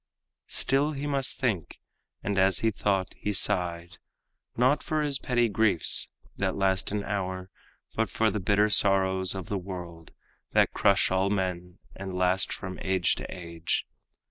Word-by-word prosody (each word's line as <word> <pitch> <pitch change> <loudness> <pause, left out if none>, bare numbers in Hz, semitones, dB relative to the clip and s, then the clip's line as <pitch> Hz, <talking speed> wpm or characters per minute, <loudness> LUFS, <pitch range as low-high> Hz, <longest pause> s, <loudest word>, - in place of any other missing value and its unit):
Still 140 +3 +1
he 140 0 -5
must 140 -2 -1
think, 110 - -2 0.4
and 100 0 0
as 95 -1 +3
he 115 - +2
thought 95 -2 -1
he 105 - -3
sighed, 85 -3 0 0.6
Not 130 +4 +3
for 155 -2 -1
his 140 -2 0
petty 120 -2 +1
griefs 105 -5 +2 0.3
that - - -1
last 95 -1 +1
an 105 -1 -2
hour, 95 -1 -4 0.4
But 115 -2 0
for 110 +3 +1
the 105 - -2
bitter 105 +2 +2
sorrows 95 -2 +4
of 95 -2 -6
the 100 - -2
world 90 -3 -8 0.4
That - - +3
crush 100 -2 +3
all 95 +1 +2
men, 90 -2 -2 0.2
and 95 -1 -6
last 90 +1 +2
from 95 -1 -6
age 95 -2 +1
to - - -7
age. 85 -2 -3
95 Hz, 155 wpm, -27 LUFS, 90-110 Hz, 0.6 s, sorrows